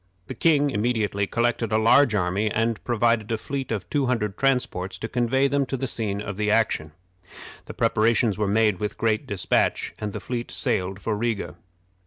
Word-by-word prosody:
The -, -, -6 dB
king 145 Hz, -3 st, +2 dB
immediately 105 Hz, -3 st, 0 dB
collected 115 Hz, -1 st, 0 dB
a 110 Hz, -, +3 dB
large 115 Hz, +2 st, +4 dB
army, 100 Hz, +3 st, 0 dB
and 115 Hz, +1 st, -1 dB
provided 115 Hz, -2 st, +1 dB
a 115 Hz, -, +1 dB
fleet 135 Hz, +2 st, -5 dB
of 105 Hz, -4 st, -3 dB
two 140 Hz, -3 st, 0 dB
hundred 105 Hz, -5 st, -1 dB
transports 125 Hz, -9 st, 0 dB
to 115 Hz, -, -5 dB
convey 125 Hz, +3 st, +1 dB
them 140 Hz, 0 st, +1 dB
to 135 Hz, -, -3 dB
the 135 Hz, -, -2 dB
scene 105 Hz, -5 st, -3 dB
of 105 Hz, 0 st, -5 dB
action. 105 Hz, -8 st, +1 dB, 0.7 s
The -, -, -8 dB
preparations 110 Hz, -1 st, +2 dB
were 105 Hz, -1 st, -1 dB
made 105 Hz, -2 st, +2 dB
with 105 Hz, -, -3 dB
great 110 Hz, -1 st, 0 dB
dispatch, 100 Hz, -3 st, 0 dB
and 105 Hz, -1 st, -3 dB
the -, -, -5 dB
fleet 120 Hz, -1 st, -4 dB
sailed 95 Hz, +1 st, -1 dB
for 110 Hz, +1 st, -2 dB
Riga. 105 Hz, -7 st, -2 dB
110 Hz, 180 wpm, -24 LUFS, 105-120 Hz, 0.7 s, large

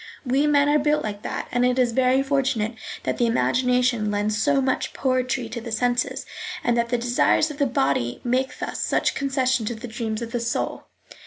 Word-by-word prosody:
We 270 Hz, +4 st, +2 dB
men 290 Hz, -1 st, +4 dB
are 295 Hz, +1 st, +4 dB
built 300 Hz, +1 st, +1 dB
like 205 Hz, -1 st, -4 dB
that, -, -, -4 dB
and 245 Hz, 0 st, +1 dB
it 250 Hz, 0 st, +2 dB
is 250 Hz, -2 st, +3 dB
very 260 Hz, +2 st, +3 dB
fortunate 270 Hz, -5 st, 0 dB, 0.3 s
that -, -, -2 dB
the 240 Hz, -, +3 dB
imagination 250 Hz, -1 st, +2 dB
lends 205 Hz, +1 st, 0 dB
so 285 Hz, +1 st, +3 dB
much 260 Hz, -1 st, -1 dB
poetry 255 Hz, -2 st, 0 dB
to 235 Hz, +1 st, -5 dB
the 230 Hz, 0 st, -7 dB
senses, 245 Hz, +2 st, 0 dB, 0.4 s
and 240 Hz, -, +2 dB
that 235 Hz, 0 st, 0 dB
the 245 Hz, -, +1 dB
desires 245 Hz, +6 st, +2 dB
of 295 Hz, -, -10 dB
the 285 Hz, -, +3 dB
body 135 Hz, -, 0 dB
make 255 Hz, +2 st, 0 dB
thus -, -, -4 dB
such -, -, +1 dB
concession 260 Hz, -4 st, 0 dB
to 240 Hz, -, -2 dB
the 235 Hz, +3 st, -8 dB
dreams 220 Hz, 0 st, -3 dB
of 230 Hz, -, -7 dB
the 240 Hz, -, -1 dB
soul. 230 Hz, 0 st, -3 dB
250 Hz, 200 wpm, -24 LUFS, 230-265 Hz, 0.4 s, men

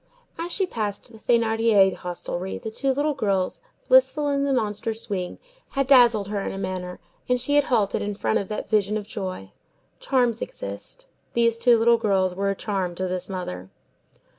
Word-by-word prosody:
As 340 Hz, +1 st, -4 dB
she 385 Hz, -, +2 dB
passed 215 Hz, -, -4 dB
the 220 Hz, -, -14 dB
Thénardier 225 Hz, -4 st, +3 dB
hostelry, 180 Hz, +1 st, -5 dB
the 220 Hz, -, -6 dB
two 270 Hz, +4 st, 0 dB
little 290 Hz, +3 st, 0 dB
girls, 195 Hz, -8 st, -1 dB, 0.3 s
blissful -, -, +4 dB
in 280 Hz, 0 st, +1 dB
the 280 Hz, -, 0 dB
monster 220 Hz, -2 st, -1 dB
swing, 195 Hz, -5 st, -4 dB, 0.4 s
had 275 Hz, -, +3 dB
dazzled 240 Hz, -6 st, +5 dB
her 205 Hz, -1 st, -2 dB
in -, -, -3 dB
a -, -, -6 dB
manner, 185 Hz, -2 st, -4 dB, 0.3 s
and 250 Hz, 0 st, +2 dB
she 260 Hz, +4 st, +1 dB
had 290 Hz, -1 st, +5 dB
halted 210 Hz, -6 st, +1 dB
in 205 Hz, 0 st, -3 dB
front 220 Hz, -, 0 dB
of 200 Hz, -, -5 dB
that 210 Hz, -, -4 dB
vision 210 Hz, -1 st, +1 dB
of 210 Hz, -, -5 dB
joy. 185 Hz, -, -6 dB, 0.5 s
Charms 245 Hz, -4 st, +1 dB
exist. -, -, -7 dB, 0.3 s
These 230 Hz, -1 st, +2 dB
two 240 Hz, 0 st, +5 dB
little 235 Hz, +1 st, +4 dB
girls 190 Hz, -4 st, +1 dB
were 195 Hz, +2 st, -1 dB
a 195 Hz, -, 0 dB
charm 190 Hz, -4 st, -2 dB
to 185 Hz, +1 st, -2 dB
this 185 Hz, +1 st, -4 dB
mother. 95 Hz, -, -5 dB
215 Hz, 185 wpm, -24 LUFS, 190-245 Hz, 0.5 s, dazzled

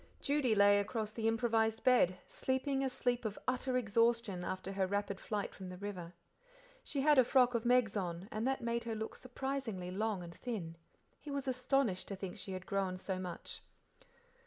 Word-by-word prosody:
Judy 275 Hz, -6 st, +2 dB
lay 205 Hz, 0 st, +6 dB
across 215 Hz, +1 st, -2 dB
the 225 Hz, 0 st, -1 dB
improvised 225 Hz, -1 st, +2 dB
bed, 245 Hz, -8 st, +5 dB
sleeping 270 Hz, +1 st, 0 dB
a 265 Hz, -, +1 dB
sleep 245 Hz, -1 st, 0 dB
of 215 Hz, -2 st, -3 dB
utter 255 Hz, 0 st, +1 dB
exhaustion 230 Hz, -4 st, +2 dB
after 185 Hz, +1 st, -3 dB
her 195 Hz, -1 st, 0 dB
rapid 200 Hz, 0 st, -1 dB
flight 210 Hz, -2 st, -3 dB
from 190 Hz, -2 st, -8 dB
the 180 Hz, -, -7 dB
river. 185 Hz, -4 st, -5 dB, 0.7 s
She 280 Hz, -, -2 dB
had 295 Hz, -1 st, +6 dB
a -, -, +8 dB
frock 250 Hz, 0 st, +4 dB
of 235 Hz, 0 st, 0 dB
Meg's 245 Hz, -3 st, +4 dB
on, 180 Hz, -1 st, -3 dB
that 260 Hz, +5 st, 0 dB
made 235 Hz, 0 st, -1 dB
her 225 Hz, -1 st, -2 dB
look 220 Hz, 0 st, -4 dB
surprisingly 255 Hz, -8 st, -4 dB
long 205 Hz, -1 st, -1 dB
and 170 Hz, -1 st, -8 dB
thin; 185 Hz, -7 st, -5 dB, 0.4 s
he 295 Hz, -, -10 dB
was 280 Hz, -1 st, -3 dB
astonished 255 Hz, -6 st, +1 dB
to 200 Hz, -, -4 dB
think 190 Hz, -1 st, -6 dB
she 190 Hz, -1 st, -6 dB
had 185 Hz, -1 st, -6 dB
grown 195 Hz, -2 st, -1 dB
so 185 Hz, 0 st, -3 dB
much. 180 Hz, -2 st, -6 dB
220 Hz, 180 wpm, -35 LUFS, 190-250 Hz, 0.7 s, a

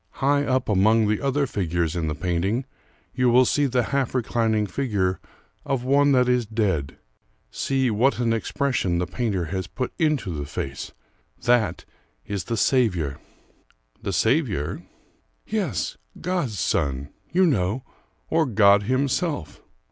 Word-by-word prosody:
High 140 Hz, +2 st, +1 dB
up 130 Hz, -1 st, 0 dB
among 110 Hz, +2 st, +3 dB
the 105 Hz, 0 st, 0 dB
other 140 Hz, +1 st, +1 dB
figures 85 Hz, -, -1 dB
in 85 Hz, -2 st, -1 dB
the 75 Hz, -, -2 dB
painting 90 Hz, -, -1 dB, 0.5 s
you 125 Hz, -1 st, +2 dB
will 125 Hz, +2 st, +6 dB
see 145 Hz, +3 st, +2 dB
the 125 Hz, -1 st, +1 dB
half 135 Hz, -2 st, 0 dB
reclining 110 Hz, -3 st, +1 dB
figure 100 Hz, -6 st, -1 dB, 0.4 s
of 135 Hz, -3 st, -1 dB
one 140 Hz, +2 st, +4 dB
that 125 Hz, -1 st, +4 dB
is 125 Hz, -2 st, +2 dB
dead 95 Hz, -11 st, -1 dB, 0.5 s
see 135 Hz, -3 st, 0 dB
what 120 Hz, +6 st, +2 dB
an 120 Hz, -2 st, +1 dB
expression 115 Hz, -5 st, 0 dB
the 90 Hz, -, 0 dB
painter 95 Hz, -2 st, -2 dB
has 95 Hz, +2 st, -3 dB
put 125 Hz, +6 st, -4 dB
into 150 Hz, -, +1 dB
the 70 Hz, -2 st, -4 dB
face! 70 Hz, 0 st, -5 dB, 0.5 s
That 120 Hz, -3 st, +2 dB, 0.4 s
is 100 Hz, -3 st, -4 dB
the 115 Hz, -1 st, -2 dB
Saviour." 90 Hz, -, +1 dB, 0.8 s
"The 100 Hz, -, -3 dB
Saviour?" 110 Hz, -, 0 dB, 0.6 s
"Yes, 190 Hz, -, -2 dB, 0.2 s
God's 170 Hz, -, -2 dB
son, 70 Hz, -1 st, -1 dB, 0.2 s
you 185 Hz, +2 st, +4 dB
know; 115 Hz, -, +1 dB, 0.4 s
or 160 Hz, -1 st, +2 dB
God 100 Hz, -3 st, +5 dB
Himself." 140 Hz, -, -1 dB
115 Hz, 140 wpm, -24 LUFS, 95-135 Hz, 0.8 s, will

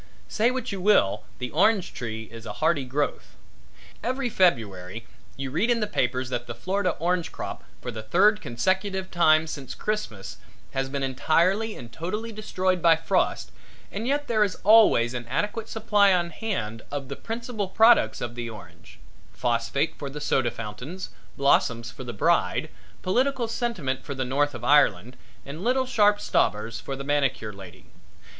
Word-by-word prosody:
Say 225 Hz, +3 st, +2 dB
what 255 Hz, -2 st, -3 dB
you 195 Hz, -2 st, -4 dB
will, 195 Hz, -, +3 dB
the 125 Hz, -1 st, -5 dB
orange 190 Hz, +4 st, +2 dB
tree 110 Hz, -2 st, -5 dB
is 115 Hz, 0 st, -10 dB
a -, -, -5 dB
hardy 155 Hz, -4 st, +1 dB
growth. 140 Hz, +3 st, -3 dB, 0.7 s
Every 255 Hz, +1 st, -1 dB
February 110 Hz, -, +1 dB, 0.3 s
you 135 Hz, -1 st, -4 dB
read 180 Hz, -, +1 dB
in 240 Hz, -1 st, +3 dB
the 210 Hz, -, +1 dB
papers 130 Hz, -9 st, -1 dB
that 120 Hz, -1 st, -3 dB
the -, -, -6 dB
Florida 190 Hz, -1 st, -1 dB
orange 175 Hz, 0 st, 0 dB
crop, -, -, -6 dB, 0.2 s
for 125 Hz, -, -4 dB
the 110 Hz, -1 st, -6 dB
third 200 Hz, -, +3 dB
consecutive 190 Hz, -, -1 dB
time 155 Hz, -2 st, +4 dB
since 140 Hz, -5 st, -6 dB
Christmas 210 Hz, -, -4 dB, 0.3 s
has 135 Hz, 0 st, -2 dB
been 140 Hz, 0 st, -3 dB
entirely 175 Hz, -, +1 dB
and 120 Hz, -1 st, -10 dB
totally 210 Hz, +7 st, -4 dB
destroyed 185 Hz, -4 st, -1 dB
by 165 Hz, -1 st, +6 dB
frost 160 Hz, -, 0 dB, 0.4 s
and 220 Hz, +4 st, -4 dB
yet 285 Hz, +2 st, 0 dB
there 215 Hz, -2 st, +3 dB
is 200 Hz, -, -1 dB
always 205 Hz, -, +6 dB
an 120 Hz, -2 st, -5 dB
adequate 210 Hz, -, -2 dB
supply 210 Hz, -2 st, +3 dB
on 175 Hz, -2 st, +1 dB
hand 155 Hz, -, -3 dB
of 140 Hz, -2 st, -4 dB
the 140 Hz, -, -5 dB
principal 225 Hz, -, -4 dB
products 220 Hz, -, +4 dB
of 120 Hz, -1 st, -4 dB
the 120 Hz, -1 st, -5 dB
orange 110 Hz, -2 st, -13 dB, 0.4 s
phosphate 120 Hz, +5 st, 0 dB
for 140 Hz, -, -4 dB
the 145 Hz, +2 st, -7 dB
soda 135 Hz, -4 st, +1 dB
fountains, 125 Hz, -, -7 dB, 0.3 s
blossoms 120 Hz, -4 st, +2 dB
for 130 Hz, -, -9 dB
the 120 Hz, -, -5 dB
bride, 105 Hz, -, +1 dB, 0.3 s
political 250 Hz, +5 st, +1 dB
sentiment 185 Hz, -, -2 dB
for 140 Hz, -, -5 dB
the 130 Hz, -1 st, -2 dB
North 145 Hz, +2 st, 0 dB
of 120 Hz, -, -8 dB
Ireland 125 Hz, -5 st, +3 dB, 0.3 s
and 150 Hz, +6 st, -7 dB
little 260 Hz, +3 st, +2 dB
sharp 210 Hz, -5 st, +4 dB
stobbers 115 Hz, -, 0 dB
for 135 Hz, -, -5 dB
the 135 Hz, -, -6 dB
manicure 135 Hz, -6 st, 0 dB
lady. 95 Hz, -3 st, -12 dB
155 Hz, 165 wpm, -26 LUFS, -, 0.7 s, by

